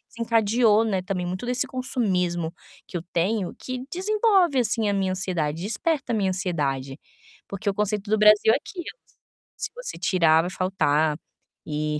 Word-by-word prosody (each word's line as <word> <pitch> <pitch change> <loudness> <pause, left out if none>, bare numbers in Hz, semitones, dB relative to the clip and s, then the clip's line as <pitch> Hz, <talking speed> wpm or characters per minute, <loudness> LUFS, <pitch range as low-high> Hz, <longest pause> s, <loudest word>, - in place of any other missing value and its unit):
desencadeou, 225 -1 +3
né, 195 -4 0
também 185 -1 -3
muito 185 +6 -4
desse 250 +1 0
consumismo 180 -10 -1 0.3
que - - -11
eu - - -5
tenho, 185 +2 0
que 255 0 -5
desenvolve, 385 - +2
assim, 225 -2 +1
a - - +1
minha 195 -1 0
ansiedade, 170 -5 -2
desperta 270 - -1
a - - +2
minha 200 -3 +1
ansiedade. 145 -8 -2 0.5
Porque 200 +1 -3
o - - 0
conceito 210 0 -2
do 215 - +3
Brasil 210 +1 +6
é - - +3
aquilo. 345 +4 -8 0.7
Se - - -3
você - - -6
tirar, 165 -4 +3
vai 175 - -3
faltar. 155 -5 +1 0.5
E 150 0 -2
200 Hz, 160 wpm, -24 LUFS, 175-235 Hz, 0.7 s, Brasil